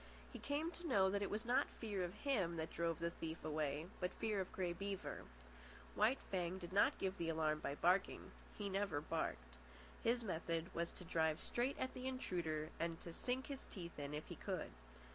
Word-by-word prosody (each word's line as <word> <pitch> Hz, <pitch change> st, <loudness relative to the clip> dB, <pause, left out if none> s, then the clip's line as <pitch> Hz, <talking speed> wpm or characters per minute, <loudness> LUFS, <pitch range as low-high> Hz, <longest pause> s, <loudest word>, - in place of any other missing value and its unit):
He -, -, -5 dB
came 300 Hz, +4 st, 0 dB
to 345 Hz, -1 st, -5 dB
know 195 Hz, -8 st, +5 dB
that 200 Hz, 0 st, +1 dB
it 200 Hz, -, +1 dB
was 215 Hz, +2 st, -1 dB
not 250 Hz, +4 st, +4 dB
fear 205 Hz, -5 st, 0 dB
of 175 Hz, +2 st, -3 dB
him 205 Hz, -13 st, +1 dB
that 160 Hz, 0 st, -2 dB
drove 170 Hz, -1 st, +1 dB
the 170 Hz, 0 st, 0 dB
thief 160 Hz, -1 st, -5 dB
away, 150 Hz, -1 st, 0 dB
but 180 Hz, 0 st, +1 dB
fear 210 Hz, -3 st, +1 dB
of 185 Hz, -, -4 dB
Grey 180 Hz, -2 st, 0 dB
Beaver. 195 Hz, +1 st, -3 dB, 0.7 s
White 255 Hz, -, +5 dB
Fang 180 Hz, -1 st, +1 dB
did 180 Hz, -1 st, -7 dB
not 200 Hz, -, +5 dB
give 190 Hz, 0 st, -1 dB
the 165 Hz, -1 st, +1 dB
alarm 155 Hz, -1 st, +2 dB
by 140 Hz, -, -1 dB
barking. 180 Hz, +5 st, +3 dB, 0.3 s
He 205 Hz, -, -1 dB
never 195 Hz, -5 st, +1 dB
barked. -, -, -2 dB, 0.4 s
His 235 Hz, +1 st, +3 dB
method 165 Hz, -3 st, -1 dB
was 170 Hz, 0 st, 0 dB
to 180 Hz, -, -8 dB
drive 160 Hz, -1 st, +2 dB
straight 245 Hz, +3 st, +1 dB
at 260 Hz, -, -1 dB
the 255 Hz, +1 st, -3 dB
intruder, 170 Hz, -, -1 dB
and 165 Hz, -1 st, 0 dB
to 170 Hz, -, -6 dB
sink 255 Hz, +6 st, -1 dB
his 275 Hz, -2 st, -5 dB
teeth 170 Hz, -5 st, -6 dB
in 145 Hz, +1 st, -2 dB
if 150 Hz, -, -3 dB
he -, -, -6 dB
could. -, -, -2 dB
180 Hz, 200 wpm, -42 LUFS, 160-210 Hz, 0.7 s, know